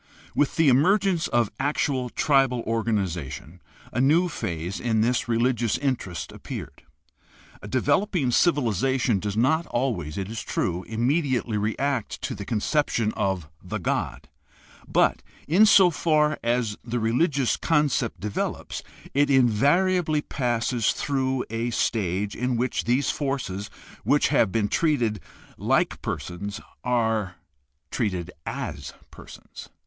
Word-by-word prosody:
— - - -24
With 145 - +1
the 165 -2 +3
emergence 175 +6 +3
of 120 -3 +1
actual 135 -2 0
tribal 135 -3 +2
organization 95 - -3 0.3
a 120 - +1
new 165 +7 +4
phase 85 - -4
in 110 -3 +1
this 120 +2 +1
religious 120 -1 +1
interest 130 -11 -3
appeared. - - -8 0.8
A - - -8
developing 180 -11 +1
civilization 130 - +2
does 105 +1 -3
not 160 +8 +2
always, 110 - -2
it 95 -1 -3
is 110 0 -5
true, 90 -2 -2
immedi 130 +6 +1
ately 115 -4 -1
react 125 +3 -1
to - - -2
the 100 0 -7
conception 115 -1 0
of 95 -5 -1 0.2
the - - -4
god, - - -2 0.6
but, - - +2 0.3
in 190 +9 +6
so 190 -3 +7
far 150 0 +2
as 120 -3 0
the 120 +1 -3
religious 130 +4 +1
concept 150 -7 +1
develops, 105 0 -3 0.3
it 145 +1 +3
invariably 150 - +3
passes 120 -2 0
through 130 -2 -1
a 115 +1 -1
stage 100 -4 -1
in 125 0 -1
which 125 +2 -1
these 125 +4 +2
forces 130 -9 -3 0.3
which - - +3
have - - +3
been 105 +1 +1
treated 120 -6 +1 0.4
like - - +1
persons 100 +4 -5 0.2
are 110 -6 0 0.6
treated 90 -7 -2 0.2
as - - -5 0.2
persons. - - -12
120 Hz, 125 wpm, -25 LUFS, 105-140 Hz, 0.8 s, so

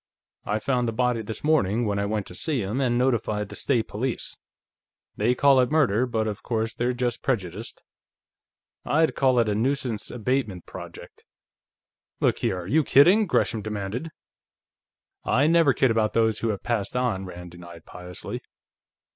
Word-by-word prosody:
I 105 - 0
found 125 +2 0
the 115 - -2
body 125 0 +1
this 110 0 -7
morning, 120 -7 +2
when 100 -1 -1
I 100 - -1
went 105 -1 -2
to - - -11
see 135 - -1
him, 110 +8 -2
and 120 -2 +1
notified 115 -5 0
the - - -9
State 120 -5 0
Police. 120 +3 -3 0.8
They 120 +4 +1
call 140 0 +5
it 125 - +3
murder, 130 -6 +2
but 110 -2 -1
of 105 -2 -4
course, 115 -1 -2
they're 120 +1 0
just 120 -1 -2
prejudiced. 110 - -3 1.0
I'd 160 +2 +2
call 130 -2 +2
it 115 -2 +3
a 105 - +1
nuisance 120 0 -1
abatement 120 -6 -2
project." - - -11 1.0
"Look - - +1
here, 90 - -1
are 85 - -9
you 155 +9 +3
kidding?" 185 +12 +5
Gresham 115 -8 +1
demanded. 105 +7 -4 1.1
"I 140 +3 +2
never 165 -2 +5
kid 130 -1 +2
about 110 -1 +1
Those 110 -2 +2
Who 115 - -1
Have 100 -3 -3
Passed 115 -2 -2
On," 120 -7 0
Rand 90 -1 -9
denied 85 -1 -12
piously. 90 0 -8
115 Hz, 165 wpm, -25 LUFS, 105-130 Hz, 1.1 s, call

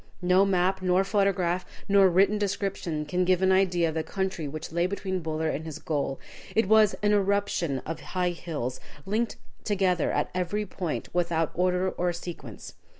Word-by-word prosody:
No 180 +2 +5
map, 190 0 +1
nor 185 +1 +3
photograph, 190 -3 +1 0.2
nor 195 -1 +6
written 195 +4 +3
description 195 -6 -2
can 180 +5 0
give 185 0 +2
an 190 - +4
idea 180 -3 +3
of - - -4
the 160 - -1
country 190 -3 -3
which 155 +3 -6
lay 170 +2 +1
between 190 -1 -3
Buller 160 -1 -2
and 155 - -4
his 160 -2 -6
goal. 140 -3 -2 0.4
It 225 -2 +3
was 215 0 +5
an 210 0 +4
eruption 200 -8 +1
of 165 - -4
high 180 -1 -1
hills, 150 -7 -4 0.3
linked 220 +4 -1 0.3
together 190 -5 +1
at - - -1
every 185 +4 -1
point 180 -4 -4
without 170 -2 +1
order 180 +1 +1
or 175 0 -1
sequence. 165 - -8
180 Hz, 170 wpm, -27 LUFS, 165-195 Hz, 0.4 s, nor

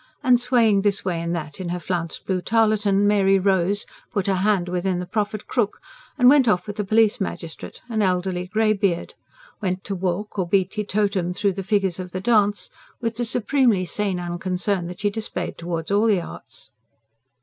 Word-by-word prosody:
And, 250 -1 +4
swaying 230 -5 +3
this 200 -1 0
way 175 -3 -1
and 170 +1 -2
that 155 -1 -6
in 180 -2 -4
her 180 +1 -2
flounced 170 -1 -4
blue 185 -2 -1
tarletan, 210 -1 +2
Mary 195 -1 +4
rose, 195 +1 +1 0.3
put 200 -5 -1
her 195 - +2
hand 190 -2 +1
within 180 +1 -1
the 180 - -3
proffered 210 +2 -2
crook, 220 -5 -1 0.4
and 250 -3 +5
went 270 -1 +6
off 180 -4 +2
with 205 0 -7
the 210 - 0
Police 215 +2 +3
Magistrate, 165 -4 -5
an 225 -3 -1
elderly 180 -1 0
greybeard; 205 -3 0 0.5
went 185 -1 -2
to 200 - -4
walk 190 +3 -3
or 180 - 0
be 190 +1 +3
teetotumed 195 -3 -1
through 200 -1 +1
the 195 - -4
figures 195 -2 0
of 180 -1 -7
the 185 - -2
dance, 205 -1 +2 0.3
with 230 -1 -3
the 240 - 0
supremely 235 -4 +2
sane 195 0 -2
unconcern 180 +1 -2
that 180 +1 -8
she 205 0 +1
displayed 200 -4 -4
towards 170 0 -4
all 205 +3 +3
the 205 -4 +3
arts. - - -10
195 Hz, 185 wpm, -23 LUFS, 180-215 Hz, 0.5 s, went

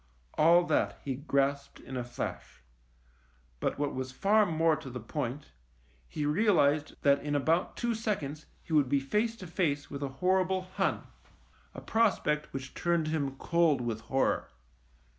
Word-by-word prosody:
All 170 +3 +5
that - - 0
he 135 - -1
grasped 140 0 -1
in 130 - -9
a 125 - -2
flash; 120 - -6 1.0
but - - -1
what 145 0 -1
was 130 0 -4
far 205 +9 +3
more 160 -1 +2
to 135 - -8
the 125 0 -6
point, 130 +3 -4 0.6
he 150 - -3
realised 155 -4 +2
that 140 -1 +4
in 145 0 -2
about 160 +5 +1
two 240 -1 0
seconds 175 -10 -3 0.2
he 165 - -7
would 145 -4 +4
be 140 - +3
face 210 +12 0
to 190 - -10
face 160 -5 -1
with 140 -1 -5
a 140 - -2
hor 185 +3 +3
rible 185 0 -2
Hun, - - 0 0.7
a - - -7
prospect 190 -9 +1
which 135 0 -6
turned 170 -2 0
him 140 -4 -1
cold 170 -3 +2
with 115 -2 -3
horror. 135 +3 0
150 Hz, 160 wpm, -30 LUFS, 140-175 Hz, 1.0 s, All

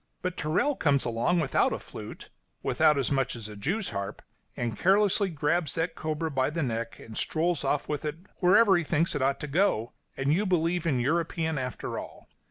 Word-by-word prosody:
But 180 -1 -2
Tyrrell 180 - +1
comes 140 -3 +2
along, 120 +9 +1
without 135 - +2
a - - -1
flute - - -10 0.3
without 150 -1 +3
as 135 -1 0
much 135 -2 +1
as 115 -3 -7
a 105 - -9
jew's 180 - -2
harp 100 -1 -5 0.3
and 120 -3 -2
carelessly 195 - +3
grabs 160 +1 0
that 165 +1 -1
cobra 155 +1 -3
by 130 -1 +1
the 160 +1 -2
neck 115 -2 -3
and 110 - -11
strolls 165 +4 0
off 140 +1 0
with 150 -2 -3
it 150 0 -2 0.2
wherever 195 +3 +5
he 175 - +2
thinks 160 +2 +1
it - - -2
ought 135 +1 +1
to 150 - -4
go, 140 - +1 0.2
and 140 +2 +1
you 200 +5 +1
believe 170 -1 +1
in 140 -6 +2
the 120 - 0
European 160 +1 0
after 125 -1 -4
all. - - -10
155 Hz, 200 wpm, -28 LUFS, 135-175 Hz, 0.3 s, wherever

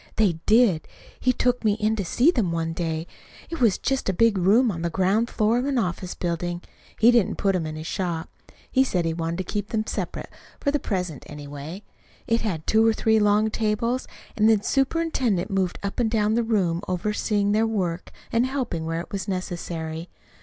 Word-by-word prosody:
"They 190 -7 +2
did. 215 -8 +4 0.3
He 255 - +3
took 250 0 0
me 215 -2 +3
in 215 +1 0
to 200 - -1
see 250 - +3
them 215 - 0
one 165 -1 -1
day. 165 -1 -2 0.5
It 330 - -4
was 220 -6 +4
just 270 -6 -1
a - - +1
big 230 +3 +3
room 210 +6 +4
on 170 -3 -5
the 170 - 0
ground 195 +7 +1
floor 225 +2 +2
of 250 - -1
an 280 -2 0
office 180 -4 -2
building. 175 0 -3 0.4
He 230 +2 +7
didn't 235 -5 +3
put 195 -1 +1
them 170 -4 -1
in 155 - -5
his 155 0 -7
shop. 170 -2 -2 0.4
He 265 - +4
said 180 -10 0
he 165 - 0
wanted 165 0 -3
to 185 - -2
keep 205 -1 -2
them 215 -2 -1
separate, - - -4 0.3
for 285 - +1
the 295 - +1
present, 180 - -3
anyway. 145 +5 -8 0.4
It 230 0 +1
had 175 -8 -3
two 220 +1 +4
or 225 0 +4
three 220 0 +2
long 210 +1 +3
tables, 230 +4 -1 0.3
and 215 +1 +4
the 215 -2 +3
superintendent 270 - 0
moved 190 -2 0
up 200 +3 -3
and 235 -2 +2
down 215 -1 +1
the 235 - +2
room 190 -7 +1
overseeing 205 +2 0
their 220 +2 +3
work, 180 -6 -2 0.2
and 235 +2 +2
helping 250 -12 -3
where 165 +1 -1
it - - -12
was 200 +1 -4
necessary. 170 -3 -4
205 Hz, 205 wpm, -24 LUFS, 175-225 Hz, 0.5 s, He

